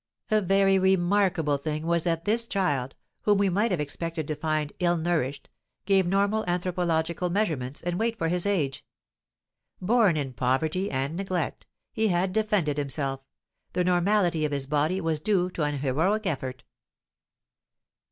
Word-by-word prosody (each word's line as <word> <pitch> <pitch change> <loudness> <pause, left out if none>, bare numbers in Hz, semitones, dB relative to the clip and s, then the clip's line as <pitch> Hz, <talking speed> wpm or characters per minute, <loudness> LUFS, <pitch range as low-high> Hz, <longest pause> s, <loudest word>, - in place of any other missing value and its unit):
A 215 0 +4
very 195 0 +3
remarkable 185 -4 +2
thing 155 +2 -3
was 170 0 +1
that 165 -1 -1
this 230 +2 +1
child, 145 - -1 0.3
whom 205 -1 +3
we 200 -1 +2
might 205 +6 +1
have 180 -5 0
expected 160 +2 -3
to 155 - -2
find 155 -1 -2
ill 175 -1 +2
nourished, 160 -5 -1 0.4
gave 195 -2 +3
normal 200 +3 +1
anthropological 175 -1 0
measurements 155 -9 -1
and 175 +1 -2
weight 225 0 0
for 165 - -1
his 180 +3 0
age. 150 -10 -1 1.0
Born 205 -3 +3
in 135 -3 -3
poverty 155 - 0
and 135 +4 -2
neglect, 185 -1 -3 0.3
he 220 -2 +1
had 185 0 +1
defended 205 -9 +1
himself; 135 -1 -2 0.5
the 180 - +1
normality 180 -2 +2
of 150 - 0
his 140 -1 -2
body 150 +6 0
was 165 -4 -1
due 185 +1 +1
to 170 - -5
an 145 -1 0
heroic 160 +11 0
effort. 130 -6 -3
175 Hz, 150 wpm, -27 LUFS, 150-195 Hz, 1.0 s, A